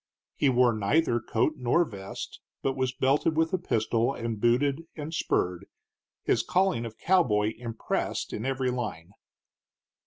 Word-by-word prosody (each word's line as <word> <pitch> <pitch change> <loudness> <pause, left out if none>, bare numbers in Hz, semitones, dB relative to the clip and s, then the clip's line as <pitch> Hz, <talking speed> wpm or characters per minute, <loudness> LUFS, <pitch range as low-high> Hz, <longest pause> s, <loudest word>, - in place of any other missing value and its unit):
He 140 - +3
wore 125 -1 +4
neither 120 +5 +2
coat 115 +7 0
nor 130 +8 +2
vest, 100 -7 -8 0.2
but 135 -1 0
was 130 -1 0
belted 140 +4 +1
with 160 +1 +2
a 185 - +2
pistol 115 -2 0
and 115 -3 -4
booted 135 +6 +2
and 155 +1 -6
spurred, 90 - -1 0.6
his - - +2
calling 185 -11 +1
of 110 - -11
cowboy 110 - +2
impressed 115 -2 -3
in 110 - -4
every 130 -1 0
line. 105 -9 -4
125 Hz, 145 wpm, -28 LUFS, 110-145 Hz, 0.6 s, wore